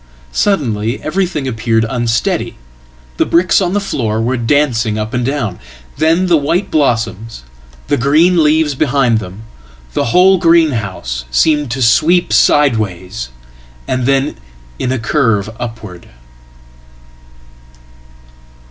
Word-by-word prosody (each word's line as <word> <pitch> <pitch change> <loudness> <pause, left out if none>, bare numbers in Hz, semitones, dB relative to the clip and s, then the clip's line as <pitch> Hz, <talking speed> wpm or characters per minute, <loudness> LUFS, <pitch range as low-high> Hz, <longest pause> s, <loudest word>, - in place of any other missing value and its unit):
Suddenly 120 - 0
everything 170 -4 -2
appeared 115 -2 0
unsteady. 120 -2 -1 0.6
The - - +2
bricks 175 +4 +3
on 180 -1 -1
thefloor 125 - -2
were 120 +3 0
dancing 120 -3 0
up 110 +3 -4
and 125 -1 -1
down. 120 -8 -3 0.4
Then 165 +5 +2
the 175 -3 +3
white 155 +7 -1
blossoms, 115 - -1 0.4
the - - 0
green 155 +8 +3
leavesbehind 145 -6 +2
them, 95 +1 -9 0.5
the - - 0
whole 185 +9 +4
greenhouse, 115 - 0
seemed 150 - +1
to 130 +2 -2
sweep 165 +10 +3
sideways, 110 - +1 0.6
and 125 -1 -1
then 135 +1 0 0.4
in 125 - -2
acurve 115 -4 0
upward. 110 -7 -8
125 Hz, 105 wpm, -14 LUFS, 115-155 Hz, 0.6 s, whole